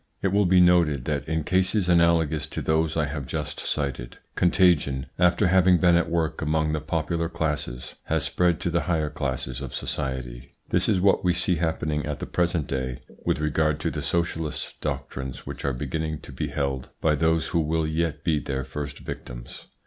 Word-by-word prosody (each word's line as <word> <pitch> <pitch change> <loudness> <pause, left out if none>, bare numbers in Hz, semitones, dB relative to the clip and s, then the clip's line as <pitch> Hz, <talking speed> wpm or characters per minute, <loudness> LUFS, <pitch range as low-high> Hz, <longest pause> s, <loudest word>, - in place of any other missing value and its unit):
It 100 - +3
will 100 0 +3
be 90 +1 +5
noted 85 -7 +4
that 75 -1 -2
in 80 -1 0
cases 95 +3 +2
analogous 85 -3 +3
to - - -5
those 80 0 +1
I 80 - +2
have 70 -2 -5
just 75 +3 -4
cited, 65 -5 -3 0.2
contagion, 85 -7 +3
after 90 +3 +4
having 95 -1 +5
been 90 -1 +4
at 85 - +2
work 80 -2 -1
among 80 0 +1
the 75 -1 -1
popular 80 +2 -1
classes, 75 -6 -3
has - - 0
spread 90 -2 +1
to 85 - -1
the 85 - +1
higher 80 -3 +1
classes 65 -3 -3
of 70 - -6
society. 65 -2 -4 0.2
This - - +1
is 95 - +3
what 100 +1 +3
we 90 -1 +3
see 90 +1 +1
happening 75 -2 -1
at 75 -1 -3
the - - -5
present 85 -3 0
day 65 -2 -3 0.3
with - - +2
regard 75 0 +1
to - - 0
the - - -4
socialist 85 -2 -2
doctrines 65 -1 -4
which - - -7
are 70 - +1
beginning 80 +4 -3
to - - -10
be - - -3
held 70 -3 -2
by 80 - +2
those 80 +2 +1
who 85 - +1
will 80 0 +1
yet 80 -1 -1
be 80 -3 +2
their 65 -2 -3
first 70 +2 -6
victims. - - -8
80 Hz, 190 wpm, -25 LUFS, 70-85 Hz, 0.3 s, be